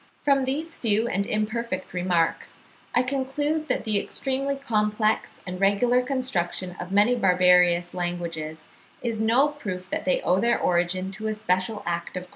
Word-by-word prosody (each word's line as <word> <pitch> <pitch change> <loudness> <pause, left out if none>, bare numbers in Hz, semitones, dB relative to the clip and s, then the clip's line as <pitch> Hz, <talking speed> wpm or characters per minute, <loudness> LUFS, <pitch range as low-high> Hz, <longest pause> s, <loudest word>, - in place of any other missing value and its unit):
From 275 -2 +3
these 315 +5 -3
few 220 0 +1
and 200 -2 -1
imperfect 215 -2 -2
remarks 175 -2 0 0.4
I 245 - +4
conclude 285 +4 -1
that - - -1
the 215 -3 +1
extremely 275 +5 -2
complex 215 -4 0
and 180 0 -6
regular 240 +6 +3
construction 190 -9 -2
of 180 +1 -6
many 205 +5 +4
barbarous 180 -4 +4
languages, 170 -3 -4 0.4
is 230 -3 -2
no 240 +6 +4
proof 190 -11 -6
that - - -2
they 185 - +2
owe 180 +2 +2
their 235 +2 +2
origin 180 +2 0
to 215 +2 -5
a 215 - -1
special 205 +1 -1
act 170 +1 -3
of 180 - -4
creation. 180 - -17
210 Hz, 160 wpm, -25 LUFS, 180-250 Hz, 0.4 s, I